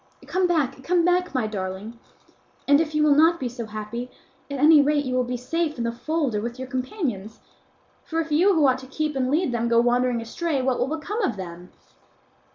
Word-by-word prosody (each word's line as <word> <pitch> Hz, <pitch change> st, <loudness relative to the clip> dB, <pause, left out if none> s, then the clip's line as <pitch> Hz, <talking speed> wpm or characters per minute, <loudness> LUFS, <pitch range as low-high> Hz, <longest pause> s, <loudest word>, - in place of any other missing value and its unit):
Come 370 Hz, 0 st, +1 dB
back, 275 Hz, -6 st, 0 dB
come 345 Hz, +2 st, +2 dB
back, 360 Hz, -3 st, +1 dB
my 255 Hz, -4 st, +1 dB
darling; 205 Hz, +2 st, -5 dB, 0.7 s
and 285 Hz, +2 st, +5 dB
if 310 Hz, -1 st, -3 dB
you 300 Hz, -, +3 dB
will 300 Hz, -1 st, +5 dB
not 325 Hz, +3 st, +4 dB
be 260 Hz, -, -2 dB
so 235 Hz, -2 st, -6 dB
happy, 215 Hz, +3 st, -6 dB, 0.4 s
at 280 Hz, -, -4 dB
any 300 Hz, +2 st, +7 dB
rate 290 Hz, 0 st, +1 dB
you 255 Hz, -, -2 dB
will 255 Hz, 0 st, +2 dB
be 250 Hz, 0 st, -3 dB
safe 305 Hz, +5 st, -2 dB
in 235 Hz, -, -2 dB
the 235 Hz, -, -1 dB
fold 290 Hz, +2 st, -2 dB
or 210 Hz, -, -1 dB
with 235 Hz, +2 st, -5 dB
your 260 Hz, 0 st, -6 dB
companions; 255 Hz, -, -4 dB, 0.6 s
for 325 Hz, -, -3 dB
if 320 Hz, -1 st, -3 dB
you 360 Hz, +6 st, +4 dB
who 310 Hz, -3 st, +4 dB
ought 260 Hz, 0 st, +2 dB
to 260 Hz, -, -11 dB
keep 305 Hz, +2 st, -3 dB
and 255 Hz, -1 st, 0 dB
lead 310 Hz, 0 st, +1 dB
them, 235 Hz, -1 st, -1 dB
go 235 Hz, 0 st, +4 dB
wandering 245 Hz, 0 st, +2 dB
astray, 280 Hz, +6 st, -2 dB
what 260 Hz, -1 st, 0 dB
will 250 Hz, -, +1 dB
become 415 Hz, +9 st, -4 dB
of 250 Hz, -, 0 dB
them?" 175 Hz, -1 st, -8 dB
260 Hz, 220 wpm, -24 LUFS, 235-315 Hz, 0.7 s, any